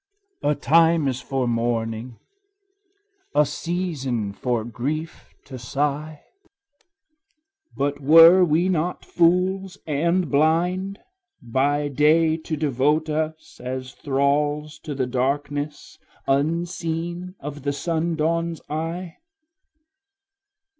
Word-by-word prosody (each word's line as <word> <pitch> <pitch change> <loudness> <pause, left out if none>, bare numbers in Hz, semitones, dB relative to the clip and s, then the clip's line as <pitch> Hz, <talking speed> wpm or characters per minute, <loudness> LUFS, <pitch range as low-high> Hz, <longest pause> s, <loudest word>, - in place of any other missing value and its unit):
A 145 +1 +1
time 165 +1 +3
is 130 -1 -2
for 130 -1 -2
mourning, 115 0 -2 1.2
a 150 - +5
season 145 - -3
for 120 0 -1
grief 140 +8 -5
to 130 -2 -9
sigh; 145 +4 -3 1.5
But 140 +1 -1
were 165 +6 +8
we 170 +2 +2
not 175 -1 -1
fools 180 +2 +1
and 170 +4 0
blind, 175 +6 +1 0.4
by 140 +5 0
day 155 +3 +3
to 160 -1 -5
devote 150 +2 +1
us 155 -1 -4
As 130 +1 -5
thralls 145 +2 0
to 150 - -6
the 130 -1 0
darkness, 145 +3 -3 0.3
unseen 170 +4 -2
of 145 +1 -7
the 140 +1 -1
sundawn's 165 +1 -1
eye? 165 +3 -4
150 Hz, 95 wpm, -23 LUFS, 135-165 Hz, 1.5 s, were